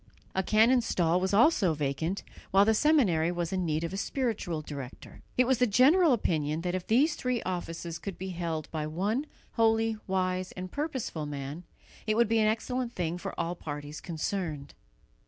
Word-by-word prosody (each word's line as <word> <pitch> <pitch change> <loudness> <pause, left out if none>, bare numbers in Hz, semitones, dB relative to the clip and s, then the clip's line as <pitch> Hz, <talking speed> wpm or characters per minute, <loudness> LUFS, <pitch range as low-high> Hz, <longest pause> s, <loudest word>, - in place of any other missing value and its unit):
A 190 - +1
canon's 230 +5 +4
stall 175 0 +2
was 190 +1 0
also 205 - +4
vacant, 150 +6 -2 0.3
while 195 +1 +5
the 220 - +4
seminary 210 - +3
was 175 0 -2
in 185 -2 0
need 155 +1 0
of 165 +2 -3
a - - -3
spiritual 200 - -2
director. 140 -4 -9 0.2
It 250 - +5
was 255 -1 +2
the 250 - +4
general 290 - +5
opinion 155 - 0
that 180 0 -2
if 185 -1 -3
these 280 +8 +4
three 250 -3 -1
offices 170 -2 -4
could 195 +1 -6
be 190 +1 -5
held 165 -3 -3
by 155 -1 -2
one 205 - -1 0.2
holy, 225 -1 +2
wise 185 -1 -1
and 185 0 -7
purposeful 260 - -3
man, 145 +4 -6 0.4
it 215 - +2
would 235 -1 +4
be 225 0 +3
an 215 - +4
excellent 240 +2 -1
thing 175 0 -2
for - - -6
all 170 - -1
parties 150 -2 -7
concerned. 160 -3 -4
185 Hz, 180 wpm, -29 LUFS, 165-225 Hz, 0.4 s, while